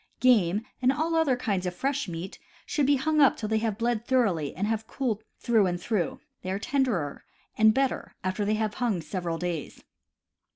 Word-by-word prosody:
Game, 215 -5 +4 0.2
and 255 +1 +4
all 315 +4 -1
other 320 -5 +3
kinds 200 -7 -1
of 180 - -4
fresh 280 +2 -1
meat, 170 +2 -6 0.3
should 290 -3 0
be 285 - +5
hung 305 +3 +2
up 275 - +5
till 215 - -3
they 220 0 +1
have 220 -2 -1
bled 230 -1 0
thoroughly 205 - +1
and 190 +6 -1
have 220 0 -2
cooled 225 -6 -2
through 225 -5 +3
and 175 -1 -2
through 185 -3 -1
— - - -52
they 185 - -5
are 190 - 0
tenderer 220 - -1 0.3
and 220 0 +6
better 265 +3 -1
after 185 +3 -1
they 210 +1 +1
have 215 -1 -1
hung 225 -7 +1
several 170 +1 -3
days. 170 -3 -4
220 Hz, 200 wpm, -27 LUFS, 185-255 Hz, 0.3 s, and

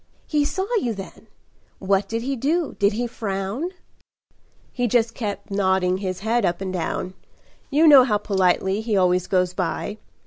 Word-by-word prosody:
"He 300 -1 +1
saw 380 +6 -2
you, 240 - -1
then? 195 -1 -10 0.5
What 195 0 0
did 230 +1 -2
he 275 +2 -1
do? 305 +6 -1
Did 200 +1 +3
he 240 +3 -1
frown?" 215 - -3 1.0
"He 245 -1 0
just 230 0 +2
kept 205 -3 -5
nodding 190 -2 +1
his 185 -1 -4
head 230 +3 +1
up 175 0 0
and 190 -1 -4
down. 180 +1 -3 0.6
You 305 +3 +3
know 285 -4 +9
how 215 -5 +1
politely 190 0 +1
he 220 -2 0
always 180 -1 +2
goes 180 -1 +1
by. 185 +4 -3
205 Hz, 165 wpm, -23 LUFS, 190-240 Hz, 1.0 s, know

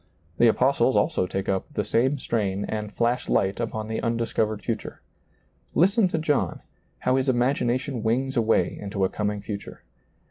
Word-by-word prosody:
The 120 - +6
apostles 130 +2 +3
also 155 - +1
take 95 +1 -3
up 95 -1 -1
the 105 - -1
same 125 +7 +1
strain 100 -6 -1
and 105 -1 -4
flash 120 +2 0
light 95 0 +1
upon 110 -2 -3
the 110 0 -3
undiscovered 115 -2 -1
future. 115 -2 -4 0.8
Listeri 195 +3 +4
to 165 - -1
John, 145 - 0 0.4
how 130 +1 +1
his 130 0 +1
ima^nation 125 0 0
wings 130 +4 0
away 115 -2 +2
into 100 -1 -1
a - - 0
coming 105 -1 -2
future. 100 -1 -7
115 Hz, 155 wpm, -25 LUFS, 105-130 Hz, 0.8 s, The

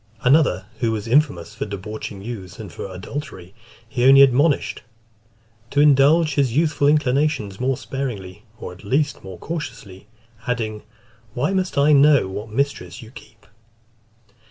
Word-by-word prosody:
Another, 135 -5 +3
who 115 -3 0
was 110 0 -4
infamous 115 - +1
for 115 - -5
debauching 100 0 -7
youths 100 -6 -8
and 100 -7 -9
for 95 - -7
adultery, 95 -2 -8 0.3
he 120 +2 -2
only 135 +1 +8
admonished 140 +3 +2 0.9
"to 145 - -1
indulge 150 +2 +4
his 135 -3 0
youthful 155 -3 +2
inclinations 145 -7 +1
more 130 0 0
sparingly, 105 -9 -6 0.2
or - - -7
at 90 - -16
least 145 +7 -1
more 95 -2 -9
cautiously;" 100 - -7 0.4
adding, 110 -4 -2 0.5
"why 145 +10 0
must 185 -4 -2
I 145 +2 +4
know 145 -4 +5
what 100 +3 -7
mistress 140 +2 -3
you 110 - -13
keep?" 110 -4 -16
125 Hz, 140 wpm, -21 LUFS, 105-145 Hz, 0.9 s, only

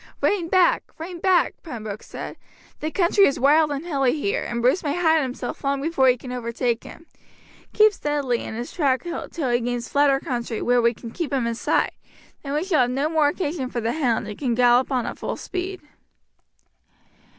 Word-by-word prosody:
"Rein 375 -5 +1
back, 365 0 +3
rein 340 +2 -7
back," 370 0 +2
Pembroke 220 - -7
said, - - -8 0.4
"the 310 - -2
country 370 +3 +4
is 275 - -1
wild 300 +3 +4
and 285 +2 -4
hilly 275 -3 +1
here, 200 -8 -1
and 235 - -3
Bruce 255 +10 +3
may 300 +3 -1
hide 320 -2 +4
himself 250 -2 -5
long 275 0 0
before 275 -3 +2
you 250 - +3
can 250 +1 -9
overtake 235 -1 -2
him. 330 - -12 0.7
Keep 430 0 +5
steadily 290 -8 -1
in - - -6
his 240 +2 -5
track 270 -6 +1
till 335 -4 -4
he 240 - +3
gains 240 -1 -3
flatter 280 -1 +3
country, 240 -4 -3
where 245 0 +2
we 235 0 +2
can 230 - -9
keep 330 +3 -4
him 265 -4 0
in 235 - -1
sight, 230 - 0 0.5
then 280 -1 -5
we 300 +2 0
shall 360 -7 +2
have 245 - +2
no 275 +4 0
more 315 -2 +3
occasion 295 -4 -2
for 240 - -3
the 230 0 -1
hound 245 -8 0
and 210 - -8
can 250 -5 0
gallop 245 +2 +4
on 250 -3 0
at - - -6
full - - -3
speed." 370 0 -5
275 Hz, 200 wpm, -23 LUFS, 245-320 Hz, 0.7 s, Keep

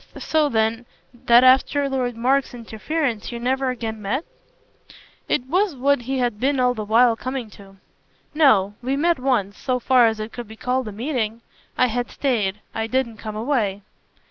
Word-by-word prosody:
"So 310 -2 +1
then 225 0 0 0.4
that 240 +1 +6
after 265 +2 +4
Lord 250 -3 -2
Mark's 260 +2 +1
interference 235 +1 -3
you 235 - -5
never 260 +2 0
again 225 -3 -4
met?" 240 +11 -2 1.0
It 255 - 0
was 360 +4 0
what 275 +1 +1
he 265 +3 -3
had 240 -4 -1
been 275 +2 +1
all 250 0 +3
the 220 -3 -5
while 230 +3 +4
coming 255 -2 -5
to. 195 -1 -15 0.6
"No; 220 -11 +4
we 265 +3 -1
met 335 +2 +2
once 225 -7 -1
so 255 -2 -1
far 250 -1 +4
as 220 -1 -1
it 215 +1 -6
could 240 -2 -7
be 220 - -11
called 250 +2 -2
a - - -5
meeting. 230 -1 -3 0.4
I 255 - +4
had 245 0 -2
stayed 210 -7 -1
I 225 0 -2
didn't 235 -2 -1
come 215 0 -7
away." 215 -5 -1
245 Hz, 175 wpm, -22 LUFS, 220-265 Hz, 1.0 s, that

